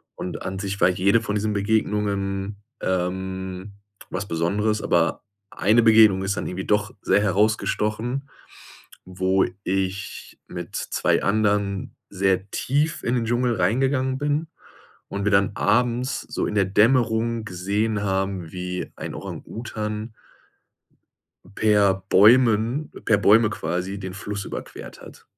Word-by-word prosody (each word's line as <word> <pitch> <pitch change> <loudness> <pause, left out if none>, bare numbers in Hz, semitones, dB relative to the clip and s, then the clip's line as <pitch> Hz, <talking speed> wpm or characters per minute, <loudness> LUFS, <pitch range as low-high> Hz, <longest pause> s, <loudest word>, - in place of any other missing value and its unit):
und 90 - -6
an 95 +1 -4
sich 100 0 -4
war - - +5
jede 95 +4 +3
von 105 -2 -3
diesen 105 +1 0
Begegnungen, 100 -1 -1 0.2
ähm, 95 +1 -3 0.4
was 95 +2 -4
Besonderes, 100 +5 0
aber 85 -1 +1 0.3
eine 110 +6 +3
Begegnung 110 -4 +6
ist 100 +1 -1
dann - - -3
irgendwie 95 +1 -4
doch 105 0 0
sehr 105 - +3
herausgestochen, 110 +5 0 0.8
wo 95 +1 +1 0.2
ich 95 +1 -3
mit - - -7
2 - - 0
anderen 100 -1 0
sehr 95 0 0
tief 150 +4 0
in 120 - 0
den 120 -2 0
Dschungel 120 +1 +1
reingegangen 130 +6 +1
bin 145 +2 -1 0.6
und 100 0 -4
wir 100 - +1
dann 100 0 +4
abends 125 +3 +1
so - - -3
in - - -3
der 100 -2 +3
Dämmerung 115 +2 +2
gesehen 100 +3 -1
haben, 95 -3 -2
wie 90 0 -4
ein - - -6
Orang-Utan 110 -1 -6 1.4
per 100 -3 +3
Bäumen 115 +6 +4
per 110 - +3
Bäume 105 +2 +5
quasi, 90 +1 -3
den 95 -2 -6
Fluss 100 0 -5
überquert - - -8
hat. - - -14
105 Hz, 130 wpm, -23 LUFS, 95-110 Hz, 1.4 s, Begegnung